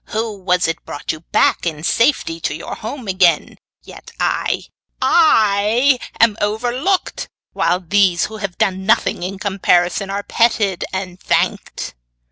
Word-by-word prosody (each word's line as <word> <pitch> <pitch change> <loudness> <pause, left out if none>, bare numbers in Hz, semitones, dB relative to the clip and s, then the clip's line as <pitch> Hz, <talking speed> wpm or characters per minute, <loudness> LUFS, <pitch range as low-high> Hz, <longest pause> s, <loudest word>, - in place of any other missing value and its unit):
Who 220 0 -3
was 180 -1 +1
it 165 - -3
brought 145 - -5
you 155 - -7
back 170 - +1
in 155 -2 -4
safety 230 - +1
to 150 - -2
your - - -7
home 230 +1 -7
again? 180 -4 +2 0.2
Yet - - -12
I - - 0 0.4
I 235 -3 +3 0.2
am 225 -2 +4
overlooked, 245 - -1 0.2
while 170 +2 +1
these 185 -1 +2
who 220 - -8
have 200 -4 -5
done 190 0 0
nothing 230 -4 +2
in 190 +2 -4
comparison, 190 -1 +1
are 200 +1 -3
petted 215 -6 +1
and 185 -1 -5
thanked. - - -1
200 Hz, 140 wpm, -18 LUFS, 180-225 Hz, 0.4 s, am